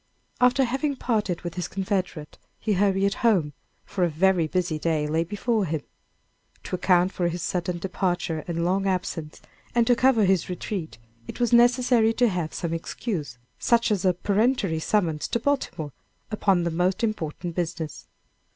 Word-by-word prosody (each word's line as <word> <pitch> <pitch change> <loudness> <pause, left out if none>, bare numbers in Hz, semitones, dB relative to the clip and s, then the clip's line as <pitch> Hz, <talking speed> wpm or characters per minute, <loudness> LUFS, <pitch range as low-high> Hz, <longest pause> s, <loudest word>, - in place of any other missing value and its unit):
After 250 +2 +4
having 270 +4 -1
parted 210 -8 -1
with 175 -1 -4
his 180 -1 -3
confederate, 185 -5 -3 0.2
he 215 - 0
hurried 195 0 +2
home, 185 -11 +3 0.3
for 185 - -2
a 175 - +3
very 170 +1 +2
busy 175 -2 -1
day 155 -1 0
lay 160 +2 +1
before 210 +4 -1
him. 160 -3 -3 0.8
To - - -3
account 180 0 +3
for 175 -3 -1
his 170 +1 -3
sudden 180 -1 -2
departure, 175 -2 -2
and 170 -1 -1
long 195 +2 +1
absence, 175 -4 -3 0.3
and 235 -1 +4
to 245 +1 +4
cover 235 -4 +4
his 185 -2 +2
retreat, 180 -2 -4 0.3
it - - -8
was 240 0 +1
necessary 240 -1 +4
to 245 +1 +3
have 175 -5 -2
some 170 -1 -3
excuse, 165 - -4 0.2
such 235 -1 +2
as 200 -2 +1
a 185 -2 +3
peremptory 200 -3 +1
summons 160 -4 0
to 235 - -1
Baltimore 235 - -1 0.4
upon 195 -4 +2
the 170 - -1
most 180 +6 0
important 175 -5 -2
business. 165 -2 -4
185 Hz, 160 wpm, -25 LUFS, 170-220 Hz, 0.8 s, After